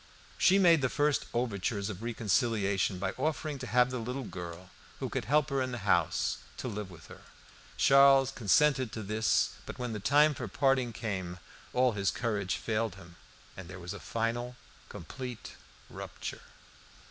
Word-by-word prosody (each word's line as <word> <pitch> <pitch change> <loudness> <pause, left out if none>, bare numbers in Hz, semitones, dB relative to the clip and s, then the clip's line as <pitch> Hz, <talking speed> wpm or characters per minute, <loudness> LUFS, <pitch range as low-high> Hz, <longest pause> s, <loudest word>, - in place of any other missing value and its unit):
She 190 - +5
made 170 -5 +5
the 130 - +1
first 145 +1 +1
overtures 105 -4 -1
of 95 0 -9
reconciliation 110 -4 0
by 95 - -2
offering 150 0 -2
to 130 - -6
have 125 +2 +3
the 125 - -3
little 125 +4 -4
girl, 90 -3 -8 0.3
who - - -3
could - - -3
help 145 +3 +2
her 135 -1 +1
in 130 0 -2
the 120 -4 -6
house, 85 -5 +2 0.2
to - - -4
live 105 -4 -5
with 85 -4 -13
her. - - -13 0.6
Charles 135 -1 +6
consented 130 +1 +3
to 110 - -5
this, 110 +2 +1 0.2
but - - -7
when 125 -2 -3
the 105 - -4
time 145 +8 +4
for 125 -4 -5
parting 130 +2 +1
came, 95 -6 -4 0.3
all 125 0 +3
his 100 -3 0
courage 105 -6 -1
failed 110 -3 -2
him. 85 -3 -14 0.4
Then 95 -2 -9
there 95 +1 -9
was 90 0 -6
a - - -8
final, 120 +2 -2 0.3
complete 125 - -8 0.3
rupture. - - -7
115 Hz, 170 wpm, -31 LUFS, 100-130 Hz, 0.6 s, Charles